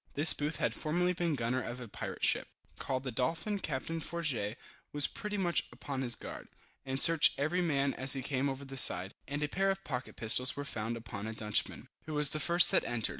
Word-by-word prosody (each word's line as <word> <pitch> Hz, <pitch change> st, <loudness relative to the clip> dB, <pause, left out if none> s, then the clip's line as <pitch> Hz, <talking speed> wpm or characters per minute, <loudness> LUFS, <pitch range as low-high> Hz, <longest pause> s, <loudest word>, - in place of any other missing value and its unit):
This 155 Hz, +3 st, +8 dB
Booth 150 Hz, +1 st, -3 dB
had 115 Hz, -, -1 dB
formerly 175 Hz, +8 st, -1 dB
been 170 Hz, -3 st, -1 dB
gunner 125 Hz, +1 st, -2 dB
of 120 Hz, 0 st, -6 dB
a 125 Hz, -, -8 dB
pirate -, -, -7 dB
ship, -, -, 0 dB, 0.3 s
called 130 Hz, 0 st, -3 dB
the 130 Hz, -, -4 dB
Dolphin. 165 Hz, -, -2 dB
Capt. 135 Hz, -7 st, -4 dB, 0.2 s
Fourgette 135 Hz, -11 st, -3 dB, 0.3 s
was 145 Hz, -1 st, +3 dB
pretty 210 Hz, -2 st, -5 dB
much 175 Hz, -3 st, 0 dB
upon 135 Hz, +2 st, -6 dB
his 120 Hz, -3 st, 0 dB
guard, -, -, -9 dB, 0.4 s
and 135 Hz, 0 st, -4 dB
searched 165 Hz, +1 st, +6 dB
every 155 Hz, +6 st, 0 dB
man 140 Hz, -5 st, 0 dB
as 130 Hz, +1 st, +1 dB
he 135 Hz, -2 st, -4 dB
came 135 Hz, +1 st, -1 dB
over 135 Hz, +1 st, -6 dB
the 135 Hz, 0 st, -8 dB
side, 95 Hz, -5 st, +4 dB
and 145 Hz, +2 st, -3 dB
a -, -, 0 dB
pair 195 Hz, +6 st, 0 dB
of 195 Hz, 0 st, -2 dB
pocket 130 Hz, -2 st, -6 dB
pistols 125 Hz, +3 st, +5 dB
were 145 Hz, -, -5 dB
found 115 Hz, -2 st, -4 dB
upon 110 Hz, -2 st, -7 dB
a 110 Hz, -, -6 dB
Dutchman, 105 Hz, -1 st, -1 dB, 0.2 s
who 155 Hz, -, -5 dB
was 150 Hz, -1 st, +3 dB
the 155 Hz, -, -1 dB
first 170 Hz, +3 st, +5 dB
that -, -, +2 dB
entered. 115 Hz, -2 st, -1 dB
135 Hz, 220 wpm, -31 LUFS, 125-160 Hz, 0.4 s, This